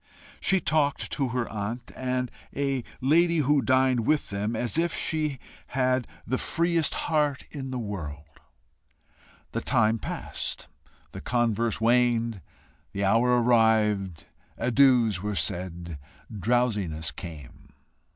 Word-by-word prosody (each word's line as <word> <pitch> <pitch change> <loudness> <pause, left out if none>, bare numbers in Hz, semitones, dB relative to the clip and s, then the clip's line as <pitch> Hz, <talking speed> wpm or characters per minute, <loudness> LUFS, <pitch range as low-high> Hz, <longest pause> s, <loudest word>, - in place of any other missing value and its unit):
She 190 - +2
talked 150 -3 0
to 140 -3 0
her 125 -1 -1
aunt 110 +3 -5
and 125 -1 -2 0.2
a 135 -2 -1 0.2
lady 170 +5 +3
who 145 -1 +3
dined 130 +1 +3
with 155 -7 +1
them 105 +3 -2
as 120 +1 -1
if 170 0 0
she 155 -3 -1 0.3
had 130 -1 0 0.2
the 130 +3 -1
freest 170 -1 +1
heart 150 -4 +1
in 135 -2 -6
the 130 - -3
world; 75 -9 -6 1.1
the - - -2
time 110 +1 +2
passed; - - -4 0.4
the - - -8
converse 115 -2 0
waned; 115 -2 +2 0.5
the 100 0 -1
hour 120 +4 +4
arrived; 105 -7 +2 0.3
adieus 120 -6 +4
were 105 0 -2
said; 85 -4 -3 0.4
drowsiness 105 -7 0
came. 80 -8 -10
120 Hz, 120 wpm, -27 LUFS, 105-135 Hz, 1.1 s, hour